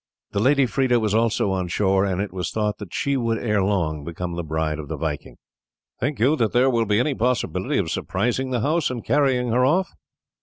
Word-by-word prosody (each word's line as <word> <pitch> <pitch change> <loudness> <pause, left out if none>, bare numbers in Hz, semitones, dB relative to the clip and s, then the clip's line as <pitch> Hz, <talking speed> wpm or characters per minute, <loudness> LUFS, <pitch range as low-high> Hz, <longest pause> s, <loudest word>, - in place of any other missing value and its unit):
The 100 - -1
lady 140 +5 +4
Freda 125 -1 +1
was 110 -2 0
also 110 -3 +1
on 95 -1 -1
shore, 95 +2 +2
and 95 -2 -1
it 100 -2 -3
was 90 -2 -3
thought 105 -1 -2
that 100 -5 -8
she 140 0 -1
would 115 -3 0
ere 105 -4 0
long 85 -7 -1
become 85 +2 -5
the 85 - -2
bride 80 -1 -2
of 75 - -7
the 80 +1 -4
Viking. 75 -1 -4 0.6
"Think 140 +2 -2
you 135 +7 +4
that 115 -5 0
there 130 +2 +4
will 115 -2 +1
be 105 +1 +2
any 140 +4 +1
possibility 125 0 -1
of - - -1
surprising 125 +7 -1
the 125 -3 -1
house 155 +5 +1
and 125 -3 -5
carrying 130 -4 +2
her 125 +2 +3
off?" 175 +8 +2
110 Hz, 220 wpm, -23 LUFS, 95-125 Hz, 0.6 s, lady